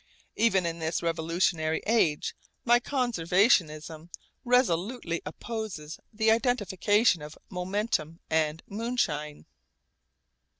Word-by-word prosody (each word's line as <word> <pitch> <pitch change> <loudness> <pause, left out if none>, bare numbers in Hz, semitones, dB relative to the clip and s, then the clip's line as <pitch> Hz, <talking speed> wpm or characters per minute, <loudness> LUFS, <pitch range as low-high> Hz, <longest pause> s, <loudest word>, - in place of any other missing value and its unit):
Even 195 -6 +2
in 170 0 -3
this 160 +1 -2
revolutionary 165 -1 0
age 205 -10 +1 0.3
my 240 0 +5
conservatism 175 - +1 0.3
resolutely 220 -6 +1
opposes 180 -4 -6
the 220 0 +2
identification 215 - +2
of 150 +1 -9
momentum 180 -3 -2
and 160 0 0
moonshine. 195 -10 -2
180 Hz, 85 wpm, -28 LUFS, 160-225 Hz, 0.3 s, my